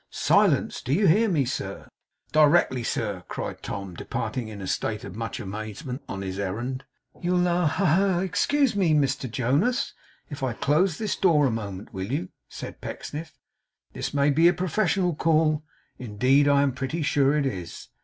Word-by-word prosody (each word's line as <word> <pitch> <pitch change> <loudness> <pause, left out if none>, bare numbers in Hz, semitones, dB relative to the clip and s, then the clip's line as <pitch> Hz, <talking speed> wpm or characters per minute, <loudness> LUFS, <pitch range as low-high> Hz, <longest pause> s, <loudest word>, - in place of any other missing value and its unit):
Silence! - - +2
Do 130 - -1
you 200 +6 +3
hear 210 +6 +4
me, 150 -7 +2
sir? 100 -6 -5 0.4
'Directly, 150 -4 +4
sir!' 100 -5 -2
cried - - -5
Tom, 100 -2 -5
departing, 115 +7 -4
in 105 -2 -8
a 95 - -6
state 105 +3 -2
of 100 -2 -8
much 115 0 -4
amazement, 110 +7 -6
on 100 0 -4
his 95 0 -5
errand. 120 +7 -3 0.4
'You'll 180 0 +2
ha, 175 -1 +2
ha, 170 +6 0
ha! 170 +2 +4 0.2
you'll - - +1
excuse 270 +7 +1
me, 175 -6 +3
Mr 135 -3 0
Jonas, 140 - 0 0.3
if 145 -2 -8
I 130 -3 -1
close 150 +7 +1
this 215 -2 -2
door 160 -6 +4
a 130 - +2
moment, 105 0 -6
will 95 +3 -4
you?' 90 -10 -2 0.2
said - - -8
Pecksniff. 155 -1 -7 0.6
'This - - -4
may 145 0 +2
be 165 +4 +5
a 175 - +5
professional 185 0 +1
call. 155 -1 +2 0.4
Indeed 130 +5 +2
I 140 0 +4
am 140 - +2
pretty 135 +6 -3
sure 140 0 +3
it 145 - +1
is. 90 -10 -5
140 Hz, 175 wpm, -25 LUFS, 110-165 Hz, 0.6 s, be